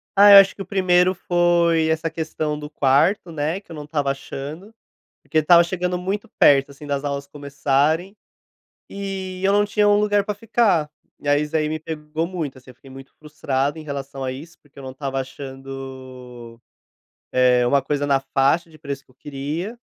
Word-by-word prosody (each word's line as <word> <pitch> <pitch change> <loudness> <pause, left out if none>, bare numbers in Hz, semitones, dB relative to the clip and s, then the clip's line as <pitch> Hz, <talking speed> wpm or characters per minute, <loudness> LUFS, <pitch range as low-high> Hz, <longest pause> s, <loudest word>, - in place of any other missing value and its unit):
Ah, 205 +1 +8
eu - - +12
acho 195 0 +6
que - - -9
o - - -5
1º 185 -1 +3
foi 175 -2 +2
essa 160 +1 0
questão 155 -1 -3
do 150 0 -8
quarto, 150 +6 +2
né, 160 +3 -2
que 185 - -19
eu - - -7
não 150 - -7
estava 145 -2 -1
achando, 145 +8 -8 0.5
porque 160 - -1
estava 170 +3 +6
chegando 180 0 -2
muito 200 +5 -4
perto, 140 -1 +5
assim, 140 +2 -12
das 140 0 -2
aulas 140 -1 -3
começarem 145 +6 -1 0.7
e 190 -2 -6
eu 195 - +3
não 205 0 +3
tinha 205 0 +2
um 205 0 +4
lugar 205 -1 +2
pra 210 - -3
ficar 205 -7 +1 0.3
e, 145 - -6
aí, 145 +1 +3
isso 150 0 -6
daí 155 -1 +1
me 155 +1 -3
pegou 155 +1 -4
muito 160 -7 -5
assim, 130 0 -16
eu - - -15
fiquei 135 +2 -17
muito 135 +1 -12
frustrado 145 -1 -2
em - - -7
relação 140 -1 -6
a 130 - -2
isso, 150 +6 -11
porque 145 -1 -21
eu - - -9
não 130 - -7
estava 135 0 -4
achando, 130 -3 -9 0.7
eh, 125 -1 +4
uma 140 +2 +3
coisa 145 +1 -2
na 140 -1 +2
faixa 140 +5 +1
de 155 - -17
preço 140 -2 -6
que - - -29
eu - - -24
queria, 150 - -5
150 Hz, 195 wpm, -22 LUFS, 135-180 Hz, 0.7 s, eu